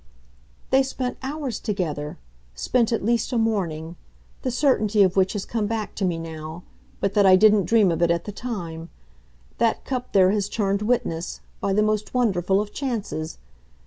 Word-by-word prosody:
"They 265 - +6
spent 260 -1 -3
together 215 - -3
hours - - -9 0.4
spent 230 - +1
at 225 -4 -1
least 235 0 +1
a 245 - 0
morning 175 -7 -1 0.4
the 255 - -1
certainty 230 -6 +3
of 185 -1 +2
which 190 -1 +3
has 205 -3 -3
come 220 -3 -1
back 220 -1 -3
to 200 - -1
me 175 -2 0
now, 160 +1 -7 0.4
but 200 0 0
that 200 -2 +5
I 185 - +8
didn't 210 0 +5
dream 210 -1 +4
of 165 0 -2
it 170 - +4
at 170 0 +1
the 210 - -4
time. 175 -8 -6 0.7
That 230 -1 +1
cup 255 -2 -4
there 190 -1 +5
has 205 -1 0
turned 200 -2 0
witness 210 -7 -1 0.2
by 195 - 0
the 210 +2 +3
most 215 +2 -1
wonderful 195 -6 +2
of 210 0 -4
chances. 215 - -3
205 Hz, 175 wpm, -24 LUFS, 175-230 Hz, 0.7 s, I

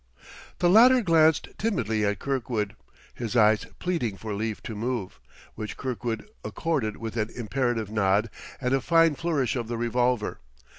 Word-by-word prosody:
The 175 - +2
latter 240 +6 +7
glanced 160 -4 +4
timidly 115 - 0
at 100 - 0
Kirkwood, 115 -6 -2 0.4
his 120 -1 -5
eyes 110 -2 +4
pleading 125 - -2
for 110 0 -5
leave 110 +1 -3
to 110 - -5
move; 115 -3 -3 0.3
which 105 -1 -6
Kirkwood 120 - -4 0.2
accorded 135 -11 -2
with 115 0 -6
an 110 0 0
imperative 120 -2 -2
nod 105 +1 +1 0.3
and 125 -1 0
a 135 - +2
fine 165 +2 +4
flourish 145 -5 -1
of 120 -3 -3
the 120 0 -3
revolver. 120 -1 0
120 Hz, 150 wpm, -26 LUFS, 110-145 Hz, 0.4 s, latter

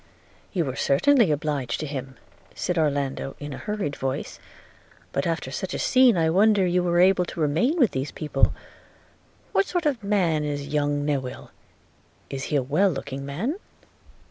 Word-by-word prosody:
'You 175 -5 0
were 130 -2 -4
certainly 230 - +3
obliged 145 -5 -1
to - - -2
him,' 135 -2 -6 0.4
said 180 -2 -1
Orlando, 140 -3 -1
in 145 0 -6
a - - -7
hurried 210 -9 -3
voice; 135 0 -4 0.7
'but 140 - -1
after 165 -5 -2
such 185 +7 -4
a - - -1
scene 255 -5 +4
I 165 -1 +3
wonder 200 +1 +4
you 180 0 +2
were 175 -1 +1
able 185 0 +5
to 170 - -8
remain 165 - +1
with 250 - +4
these 135 +2 -3
people 150 -3 +1 0.5
– - - -33
What - - +3
sort 355 -2 -2
of 275 -6 +1
a 200 - -8
man 175 -7 +2
is 145 -1 -3
young 145 -1 0
Newill? 135 -4 -3 0.8
Is 135 0 -4
he 150 - -2
a 140 - +2
well 155 +10 +2
looking 140 -3 -5
man?' 225 - -3
155 Hz, 175 wpm, -25 LUFS, 140-195 Hz, 0.8 s, able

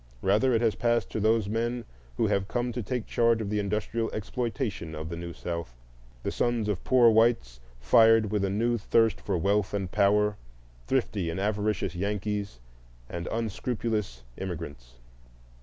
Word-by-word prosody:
Rather 105 +7 +3
it 115 -1 +2
has 115 -3 +3
passed 120 -3 0
to - - -2
those 110 -1 +2
men 120 +3 -2 0.3
who - - +2
have 95 -1 0
come 120 +2 -1
to 120 +1 -3
take 120 +2 -3
charge 115 -1 +2
of 105 -2 -3
the 105 - +1
industrial 105 +3 -1
exploitation 110 - -3
of 80 +1 -5
the 85 - -4
New 85 0 -6
South,—the - - -7
sons 120 -3 0
of 100 -3 -2
poor 125 -3 +5
whites 110 - +2 0.2
fired 110 - +5
with 105 -2 0
a 100 - +1
new 115 +4 +1
thirst 115 +2 +2
for 95 -3 -1
wealth 100 +3 +1
and 95 -2 -3
power, 105 +1 +3 0.5
thrifty 105 -9 0
and 85 +3 -3
avaricious 105 -3 -1
Yankees, 100 - -3 0.5
and 85 0 -4
unscrupulous 110 - -2
immigrants. 75 -10 -7
105 Hz, 155 wpm, -28 LUFS, 90-115 Hz, 0.5 s, poor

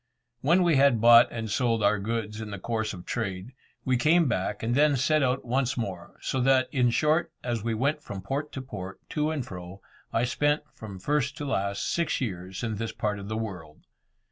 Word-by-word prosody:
When 170 +8 +3
we 170 -5 +3
had 135 -4 +5
bought 115 +1 +8
and 115 -1 -4
sold 115 0 +1
our 105 0 +3
goods 110 0 -3
in 110 - -6
the 100 - -5
course 110 +2 -2
of 90 -3 -9
trade, 100 0 -4 0.3
we 130 -1 +2
came 160 +5 +4
back, 95 -4 -2
and 115 +1 0
then 145 +2 +4
set 155 +4 +2
out 130 0 0
once 130 +2 0
more; 95 -7 -5
so 130 - -1
that, 130 0 +4
in 125 -4 +3
short, 155 +7 +2
as 120 -4 -2
we 115 -1 -1
went 140 +6 0
from 95 -7 -7
port 140 +8 -3
to 135 - -5
port, 95 -7 -7
to 150 0 0
and 150 -6 -2
fro, 90 +1 -9 0.3
I 115 - +1
spent, 145 +5 +1
from 105 -3 -9
first 140 - -1
to 145 - -4
last, 100 -7 -1
six 170 -2 0
years 95 -4 -4
in 110 -2 -2
this 115 +1 -3
part 105 -1 -2
of 100 - -8
the 110 +1 -3
world. 90 -9 -7
115 Hz, 210 wpm, -27 LUFS, 100-140 Hz, 0.3 s, bought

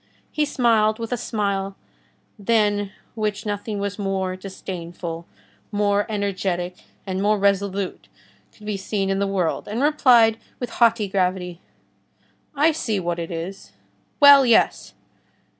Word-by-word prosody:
He 300 - +1
smiled 225 -6 +2
with 230 0 -6
a - - +1
smile 200 -4 -2 0.6
than 205 -2 +1 0.2
which 210 -2 -2
nothing 205 0 -3
more 190 -2 -1
disdainful, 175 -3 -7 0.4
more 205 -1 +1
energetic, 185 -4 -2 0.3
and 190 -1 -3
more 210 +1 +3
resolute 200 -1 -1 0.4
could 210 - -16
be 210 -1 -2
seen 195 0 -2
in 195 - 0
the 200 - +1
world, 185 -4 -1
and 225 +6 -2
replied 245 -7 +5 0.2
with 245 -2 -4
haughty 230 -3 +3
gravity:— 180 -2 -1 0.9
"I 305 +3 +4
see 225 -10 -2
what 175 -1 -2
it 165 - -4
is. 175 +3 -7 0.5
Well, 285 -1 +9
yes!" 235 -3 +2
200 Hz, 125 wpm, -22 LUFS, 190-220 Hz, 0.9 s, Well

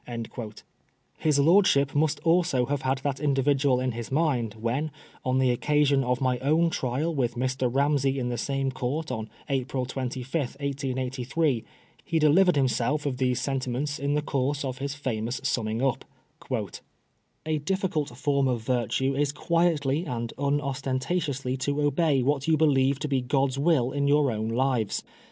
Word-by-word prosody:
^' 115 -2 -7 0.6
His 150 -2 +2
lordship 140 -3 +4
must 150 0 +1
also 165 -7 +2
have 140 +1 -2
had 130 +1 0
that 140 -2 -1
individual 140 -2 +2
in 130 0 0
his 115 +1 -6
mind 130 -8 0
when, 120 +8 -2 0.3
on 130 0 +1
the 130 -1 +3
oc 120 - -4
casion 145 -2 +3
of 125 0 0
my 130 -2 +1
own 160 +5 +2
trial 140 +6 -1
with 125 -5 -1
Mr. 130 0 -1
Ramsey 140 0 +2
in 125 -2 -1
the 120 - -2
same 135 +1 -1
Court 135 +4 -3
on 110 -3 -4 0.2
April 130 -1 -1
25, 130 0 -5
1883, 135 -1 -1 0.4
he 165 - -1
delivered 160 +4 +5
himself 140 +2 +1
of 135 -3 -1
tiiese 125 -2 +1
sentiment 135 +1 -2
in 140 +1 0
the 150 - 0
course 140 0 -1
of 130 -1 -4
his 140 +1 -3
famous 120 -3 -3
summing 110 +1 -1
up: 135 -2 0 0.7
*' - - -32
A 155 -1 0
difficult 155 -2 -1
fonn 140 -2 0
of 120 -3 -3
virtue 130 +2 0
is 145 0 +1
quietly 160 -1 +1
and 120 -3 -4
unostentatiously 140 0 -1
to 140 +2 -1
obey 145 -1 +2
what 140 +1 0
you 160 -1 +4
believe 140 -3 +3
to 145 - -3
be 135 -3 +1
God's 135 +1 0
will 140 -5 +2
in 140 0 0
your 145 -2 +3
own 110 0 -2
lives. 120 -3 0
135 Hz, 165 wpm, -26 LUFS, 125-145 Hz, 0.7 s, delivered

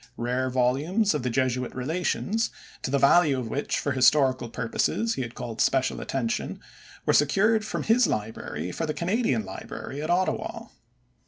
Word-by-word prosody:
Rare 125 +2 -1
volumes 140 - +1
of - - -1
the 125 - -1
Jesuit 125 0 -1
Relations, 180 - -1 0.3
to - - -3
the 140 - +2
value 140 +1 +5
of 120 -3 -4
which 145 - -1
for 145 - -1
historical 130 -1 +3
purposes 125 - -1
he - - -3
had 120 -1 -6
called 115 -2 -4
special 135 -1 +1
attention, 120 -4 -2 0.5
were - - +3
secured 205 +10 +3
from 215 - -3
his 230 +1 +4
library 105 -6 -4
for 165 - -3
the 155 - -2
Canadian 175 - 0
library 140 +7 -7
at 155 - -4
Ottawa. 205 +6 -1
135 Hz, 160 wpm, -26 LUFS, 125-180 Hz, 0.5 s, value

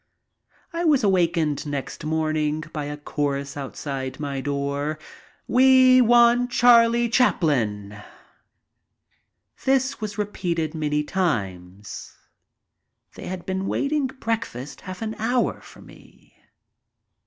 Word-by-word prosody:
I 335 +1 -2
was 295 -7 +3
awakened 170 -7 +1
next 145 0 -5
morning 155 -1 -1
by 150 -2 -3
a 145 0 -5
chorus 140 -1 -3
outside 135 -1 -5
my 140 -2 -3
door: 140 +2 -2 0.5
"We 255 0 +6
want 240 +1 +5
Charlie 235 -1 +5
Chaplin." 115 - 0 1.6
This 265 -1 +1
was 210 -1 -5
repeated 175 -6 -2
many 150 -2 -1
times. 100 - -4 1.0
They - - -9
had 185 -1 -6
been 190 0 -3
waiting 285 -1 0
breakfast 225 - -5
half 185 +3 -7
an 220 0 -3
hour 240 +3 0
for - - -15
me. - - -19
165 Hz, 105 wpm, -23 LUFS, 145-235 Hz, 1.6 s, We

